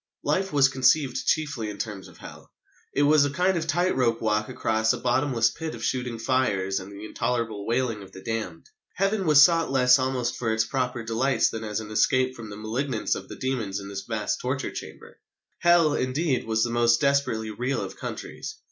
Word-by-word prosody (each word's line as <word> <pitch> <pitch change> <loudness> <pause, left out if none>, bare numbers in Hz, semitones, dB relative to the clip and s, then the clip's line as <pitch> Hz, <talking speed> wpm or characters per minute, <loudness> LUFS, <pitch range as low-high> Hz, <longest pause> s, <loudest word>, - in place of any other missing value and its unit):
Life 190 +1 0
was 140 -2 +5
conceived 130 0 +2
chiefly 140 -8 0
in 105 - -7
terms 105 -3 -5
of - - -16
Hell. - - -12 0.4
It 145 - +1
was 150 0 +5
a 145 - +1
kind 180 +7 +1
of 165 -1 -2
tight 175 +4 +1
rope 115 -3 +1
walk 105 -1 0
across 110 0 +1
a - - -3
bottomless 120 -3 +1
pit 160 -1 -6
of - - -9
shooting 125 -2 -2
fires 105 -6 0
and 95 +1 -10
the 100 +1 -9
intolerable 110 -2 -2
wailing 115 -2 0
of 95 -1 -12
the 95 - -12
damned. 115 +7 -4 0.3
Heaven 195 -1 0
was 150 -2 +8
sought 165 0 +3
less 130 -1 +5
almost 130 -2 -1
for 115 -2 -1
its 110 +1 +1
proper 125 -1 -2
delights 115 +2 +1
than 110 0 -5
as 105 -1 -3
an 110 -1 -9
escape 130 +4 +2
from 115 -3 -9
the 100 - -8
malignance 115 +3 -2
of - - -6
the - - -7
demons 115 -7 -2
in 100 0 -8
this 100 -1 -5
vast 105 +1 -3
torture 130 +2 -2
chamber. - - -10 0.4
Hell, 170 -3 +4
indeed, 130 +1 0
was 110 0 +1
the 120 - -1
most 120 0 +3
desperately 140 -6 +1
real 125 +6 -2
of - - -7
countries. - - -7
125 Hz, 200 wpm, -25 LUFS, 110-140 Hz, 0.4 s, was